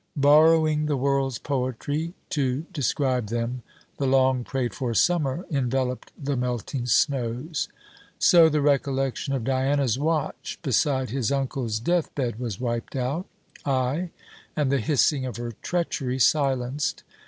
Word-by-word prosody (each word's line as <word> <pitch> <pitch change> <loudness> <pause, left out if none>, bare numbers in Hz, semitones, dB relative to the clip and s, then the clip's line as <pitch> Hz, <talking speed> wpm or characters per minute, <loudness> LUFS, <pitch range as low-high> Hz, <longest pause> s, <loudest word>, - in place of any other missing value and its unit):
Borrowing 155 +1 +5
the 145 -2 0
world's 135 -1 0
poetry 145 +6 -2 0.2
to 135 0 0
describe 130 -4 0
them, 120 +3 -2 0.4
the 140 - 0
long 130 -1 +3
prayed 130 -2 -2
for 120 -3 -3
Summer 165 - +1
enveloped 130 -2 -1
the 140 0 -2
melting 125 0 -2
snows. 130 +4 0 0.5
So 170 -2 +6
the 150 -1 +1
recollection 135 -1 0
of 130 - -2
Diana's 130 -1 +1
watch 155 0 -2
beside 130 -2 +1
his 130 -3 -1
uncle's 135 -5 -1
death 170 +8 0
bed 120 -5 -2
was 115 -6 -4
wiped 120 +1 -3
out. 135 +8 -2 0.4
Ay, 135 +6 0 0.5
and 145 -3 +1
the 140 - +2
hissing 145 -1 +2
of 125 -4 -4
her 120 0 -4
treachery 145 -7 -1
silenced. 135 0 +1
135 Hz, 130 wpm, -25 LUFS, 125-145 Hz, 0.5 s, So